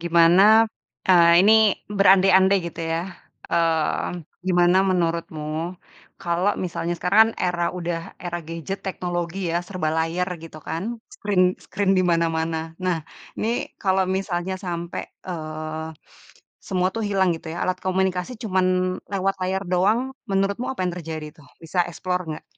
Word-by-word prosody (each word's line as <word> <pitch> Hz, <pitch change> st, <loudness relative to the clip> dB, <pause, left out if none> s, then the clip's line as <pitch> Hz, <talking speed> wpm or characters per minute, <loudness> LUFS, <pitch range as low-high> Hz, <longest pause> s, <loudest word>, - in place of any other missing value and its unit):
gimana, 170 Hz, +2 st, +5 dB, 0.7 s
eee, 170 Hz, -1 st, +7 dB
ini 210 Hz, +3 st, +6 dB, 0.4 s
berandai-andai 195 Hz, 0 st, +6 dB
gitu 170 Hz, 0 st, -7 dB
ya, 165 Hz, -, 0 dB, 0.5 s
mmm, 165 Hz, +1 st, 0 dB, 0.2 s
gimana 175 Hz, 0 st, +4 dB
menurutmu, 170 Hz, -3 st, -1 dB, 0.8 s
kalo 175 Hz, +2 st, 0 dB, 0.2 s
misalnya 175 Hz, -1 st, -2 dB
sekarang 180 Hz, +4 st, +1 dB
kan 225 Hz, -, +2 dB
era 175 Hz, -1 st, 0 dB, 0.2 s
udah 170 Hz, -1 st, -2 dB, 0.2 s
era 175 Hz, -1 st, -3 dB
gadget 165 Hz, +4 st, -5 dB
teknologi 175 Hz, -1 st, -3 dB
ya, 170 Hz, -, +1 dB
serba 180 Hz, -5 st, -2 dB
layar 170 Hz, +3 st, 0 dB
gitu 165 Hz, -1 st, -10 dB
kan, 165 Hz, -, -2 dB, 0.3 s
screen 205 Hz, -3 st, +1 dB, 0.2 s
screen 195 Hz, 0 st, 0 dB
di -, -, +4 dB
mana-mana. 165 Hz, -1 st, +1 dB, 0.3 s
Nah, 175 Hz, -3 st, 0 dB, 0.3 s
ini 220 Hz, -, -1 dB, 0.3 s
kalo 190 Hz, -2 st, +2 dB, 0.2 s
misalnya 190 Hz, -1 st, -2 dB
sampe, 170 Hz, -1 st, -4 dB, 0.3 s
eee, 155 Hz, -2 st, -5 dB, 0.8 s
semua 185 Hz, -1 st, +1 dB
tuh 225 Hz, -, -2 dB
hilang 190 Hz, -2 st, +2 dB
gitu 165 Hz, -, -13 dB
ya, 170 Hz, -, -5 dB
alat 185 Hz, 0 st, -1 dB
komunikasi 185 Hz, +1 st, 0 dB
cuma 190 Hz, -4 st, +1 dB, 0.5 s
lewat 195 Hz, 0 st, 0 dB
layar 190 Hz, +1 st, -1 dB
doang, 195 Hz, +6 st, +3 dB, 0.3 s
menurutmu 195 Hz, +5 st, 0 dB
apa 265 Hz, -, -5 dB
yang 175 Hz, -, -2 dB
terjadi 160 Hz, -2 st, -5 dB, 0.2 s
tuh? -, -, -18 dB, 0.2 s
Bisa 165 Hz, +3 st, -5 dB
explore 180 Hz, +1 st, -2 dB
nggak? 155 Hz, -, -7 dB
180 Hz, 140 wpm, -23 LUFS, 165-190 Hz, 0.8 s, eee